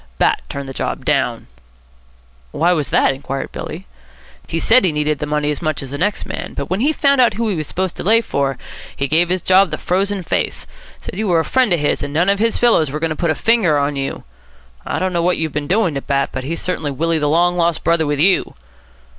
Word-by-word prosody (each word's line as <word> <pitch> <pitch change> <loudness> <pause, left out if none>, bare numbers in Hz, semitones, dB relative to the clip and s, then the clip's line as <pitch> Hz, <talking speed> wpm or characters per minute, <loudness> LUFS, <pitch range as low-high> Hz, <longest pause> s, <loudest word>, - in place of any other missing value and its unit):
"Bat - - +2
turned 140 -1 -5
the 135 - -7
job - - -4
down." - - 0 1.0
"Why 170 - +1
was 150 -5 -1
that?" - - +3
inquired 135 0 -5
Billy. - - -7 0.6
"He 165 - -3
said 230 +9 +4
he 185 - +3
needed 150 -1 -1
the 150 - -3
money 150 0 0
as 145 - -4
much 155 -4 -2
as 135 - -8
the 140 - -4
next 205 +4 0
man, - - -6
but - - -5
when 185 - 0
he 280 +6 +2
found 280 -3 +3
out 235 -4 +3
who 230 +1 -1
he 200 - -1
was 155 -3 -3
supposed 185 -1 -2
to - - -4
lay 225 +4 +4
for, 140 - -1 0.4
he 140 - -2
gave 165 +4 +2
his 185 -1 0
job 190 0 +4
the 155 - -3
frozen 195 +1 -1
face. - - -2 0.3
Said 185 - -8
you 220 - -1
were 175 -3 +3
a 160 - -1
friend 260 -5 +2
of 175 - +3
his 145 - 0
and 145 - -5
none 175 +4 +3
of 200 0 +2
his 230 +1 +1
fellows 225 - +3
were 150 +3 -4
going 165 0 -1
to - - -2
put 170 +1 -1
a 155 - +1
finger 210 -9 +3
on 145 0 0
you. 135 0 -4 0.6
I - - -2
don't 185 0 -1
know 170 - +1
what 180 +1 +1
you've 160 -1 -2
been 150 -1 -3
doing 185 -2 +1
to 140 - -3
Bat, 140 0 0
but 130 0 -5
he's 165 +4 -3
certainly 160 -5 -2
Willie 160 +4 0
the 150 -1 0
Long 175 +3 +3
Lost 170 -2 0
Brother 165 -2 +2
with 145 0 0
you." 185 +5 +2
165 Hz, 250 wpm, -18 LUFS, 150-190 Hz, 1.0 s, said